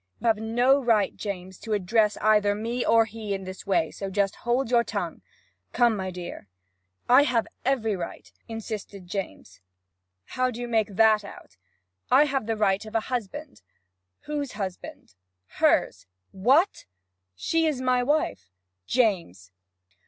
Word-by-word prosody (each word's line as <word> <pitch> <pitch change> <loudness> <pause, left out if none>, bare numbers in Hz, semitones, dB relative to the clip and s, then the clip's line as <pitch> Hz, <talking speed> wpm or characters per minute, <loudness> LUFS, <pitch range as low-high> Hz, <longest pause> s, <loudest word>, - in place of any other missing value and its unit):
'You - - -8
have 225 -2 +4
no 240 +5 +2
right, 220 -5 +2
James, 190 -3 -6
to 220 - -4
address 210 +2 +2
either 210 -1 +4
me 230 +4 -2
or 225 0 +4
her - - -14
in 205 -4 -4
this 185 +1 -9
way; 165 -5 +1
so 195 - -5
just 195 0 0
hold 240 +1 -1
your 235 -1 +4
tongue. - - -4 0.5
Come, 240 -2 +3
my 190 -2 -3
dear.' 175 - -8 0.6
'I 255 +3 +7
have 235 -4 +1 0.2
every 235 -5 +1
right!' 175 -2 -7
insisted 215 -4 -6
James. 180 - -6 0.6
'How 255 - -1
do 240 -1 -7
you 245 - -4
make 220 -4 0
that 220 0 +5
out?' 200 - -12 0.5
'I 275 +4 +6
have 270 -6 -2
the 225 -1 -1
right 200 -1 +2
of 215 +1 -10
a - - +4
husband.' 260 +6 -5 0.6
'Whose 290 -3 -4
husband?' 190 - -7 0.3
'Hers.' 90 - +1 0.2
'What?' 265 - +2 0.5
'She's 315 - 0
my 255 -1 +2
wife.' 245 - -1 0.4
'James!' 170 - 0
220 Hz, 145 wpm, -26 LUFS, 195-245 Hz, 0.6 s, I